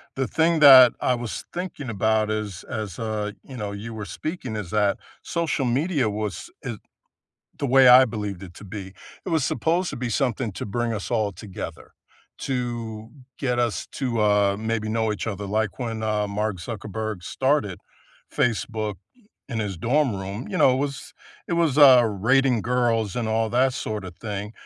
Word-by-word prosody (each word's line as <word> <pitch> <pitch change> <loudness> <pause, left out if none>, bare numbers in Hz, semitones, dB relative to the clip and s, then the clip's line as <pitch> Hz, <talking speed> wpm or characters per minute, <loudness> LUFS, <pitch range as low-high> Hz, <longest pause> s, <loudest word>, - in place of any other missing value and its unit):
The 135 -1 -1
thing 165 0 +2
that 130 -4 +9
I 125 - +2
was 120 -2 -5
thinking 175 -7 -5
about 110 0 +1
is 105 -4 -3
as, 105 -5 -5
uh, 105 -2 -2
you 130 -2 -10
know, 105 -2 -4
you 110 +3 -7
were 105 -2 -6
speaking 155 - -5
is 105 -5 -5
that 105 -2 +2 0.2
social 165 -5 -1
media 135 -1 +1
was 105 - -4
id - - -5 0.8
the 145 - -1
way 130 0 +6
I 130 +1 +9
believed 105 -5 -5
it 90 -2 -12
to - - -12
be, 95 -1 -7 0.3
it - - -3
was 160 -4 +2
supposed 170 +5 0
to - - -6
be 120 -1 -3
something 125 -3 -1
to - - -5
bring 120 +3 -2
us 105 +1 -4
all 110 -4 0
together, 95 -5 -8 0.5
to 115 -4 -4 0.3
get 125 -3 -1
us 120 -3 -1
to, 120 -5 -1
uh, 105 -1 +3
maybe 110 0 -2
know 110 -1 0
each 100 +1 -5
other, 105 -2 -4
like 110 +1 -1
when, 115 -3 -4
um, 105 -1 0
Mark 105 -2 -2
Zuckerberg 105 0 -5
started 130 -9 0 0.5
Facebook 110 -3 -1 0.5
in 115 -4 -3
his 100 -4 -3
dorm 130 - +1
room, 100 +5 -5
you - - -3
know? 130 - +5
It 130 - +1
was 140 0 -4 0.3
it 170 - 0
was, 165 -5 +2
uh, 130 -4 +8
rating 120 +4 +2
girls 115 -4 0
and 120 -2 -1
all 110 0 +1
that 130 +3 +3
sort 105 -5 -4
of 90 -2 -8
thing, 105 -1 -5
110 Hz, 180 wpm, -24 LUFS, 105-130 Hz, 0.8 s, that